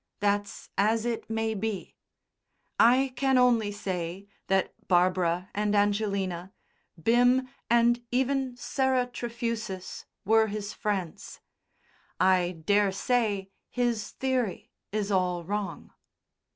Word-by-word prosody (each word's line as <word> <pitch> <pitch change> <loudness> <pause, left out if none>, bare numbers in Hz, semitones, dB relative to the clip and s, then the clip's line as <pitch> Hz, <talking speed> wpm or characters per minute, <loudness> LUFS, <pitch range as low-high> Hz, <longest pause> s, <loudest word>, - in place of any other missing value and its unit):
That's 205 0 -1
as 220 +3 +2
it 235 -1 -3
may 225 0 -1
be. 210 -3 -4 0.8
I 255 +3 +5
can 270 -1 +2
only 235 -4 +3
say 185 -2 -4 0.2
that 195 0 +1
Barbara 180 0 +2
and 210 0 0
Angelina, 200 -3 0 0.5
Bim 245 +7 +3 0.2
and 235 0 +3
even 260 0 0
Sarah 260 0 +1
Trefusis 230 -5 -5 0.2
were 220 +2 +4
his 210 0 -5
friends. 195 -6 -4 0.8
I 180 -3 +2
daresay 205 +1 +1 0.2
his 240 -4 -1
theory 255 -7 -2 0.2
is 210 0 -1
all 180 -2 +1
wrong. 205 +3 -4
210 Hz, 100 wpm, -28 LUFS, 190-240 Hz, 0.8 s, I